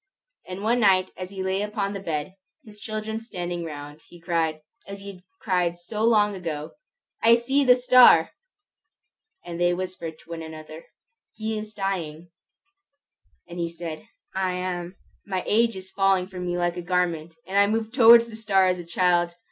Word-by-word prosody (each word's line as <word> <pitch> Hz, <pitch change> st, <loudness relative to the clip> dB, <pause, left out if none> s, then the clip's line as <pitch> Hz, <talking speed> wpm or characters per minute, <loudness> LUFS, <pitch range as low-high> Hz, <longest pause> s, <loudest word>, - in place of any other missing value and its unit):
And 185 Hz, +2 st, -7 dB
one 235 Hz, +3 st, +2 dB
night 190 Hz, -4 st, +3 dB
as 185 Hz, 0 st, -7 dB
he 190 Hz, -1 st, -5 dB
lay 190 Hz, +1 st, -1 dB
upon 205 Hz, -1 st, -2 dB
his 195 Hz, -1 st, -6 dB
bed, 155 Hz, +1 st, -3 dB, 0.3 s
his 210 Hz, -1 st, -14 dB
children 215 Hz, 0 st, -4 dB
standing 175 Hz, -6 st, -5 dB
round, 145 Hz, -1 st, -8 dB
he 175 Hz, -, -15 dB
cried, 165 Hz, -2 st, -1 dB, 0.3 s
as 200 Hz, 0 st, -8 dB
he 200 Hz, 0 st, -7 dB
had 180 Hz, -2 st, -16 dB, 0.2 s
cried 180 Hz, -3 st, 0 dB
so 210 Hz, +5 st, -5 dB
long 210 Hz, -3 st, +4 dB
ago, 160 Hz, -5 st, -5 dB, 0.5 s
"I 230 Hz, +1 st, +6 dB
see 270 Hz, +4 st, +1 dB
the 250 Hz, -2 st, +6 dB
star!" 250 Hz, -9 st, +6 dB, 1.1 s
They 175 Hz, +1 st, 0 dB
whispered 180 Hz, -3 st, -5 dB
one 165 Hz, -1 st, -7 dB
another, 155 Hz, 0 st, -10 dB, 0.5 s
"He 220 Hz, 0 st, -4 dB
is 215 Hz, 0 st, -7 dB
dying." 175 Hz, -5 st, -4 dB, 1.2 s
And 175 Hz, 0 st, -8 dB
he 170 Hz, -1 st, -1 dB
said, 170 Hz, +3 st, -8 dB, 0.3 s
"I 190 Hz, -1 st, -1 dB
am. 180 Hz, 0 st, -4 dB, 0.3 s
My 190 Hz, -2 st, -2 dB
age 230 Hz, 0 st, +2 dB
is 190 Hz, 0 st, -9 dB
falling 195 Hz, -2 st, +2 dB
from 180 Hz, -2 st, -6 dB
me 175 Hz, 0 st, -1 dB
like 175 Hz, 0 st, -1 dB
a -, -, -3 dB
garment, 170 Hz, -2 st, -1 dB
and 195 Hz, +2 st, +1 dB
I 200 Hz, -, +5 dB
move 220 Hz, +1 st, -1 dB
towards 235 Hz, -2 st, +8 dB
the 225 Hz, -, -10 dB
star 200 Hz, -4 st, +2 dB
as 180 Hz, 0 st, -1 dB
a -, -, -6 dB
child. 175 Hz, 0 st, +1 dB
185 Hz, 170 wpm, -25 LUFS, 170-210 Hz, 1.2 s, towards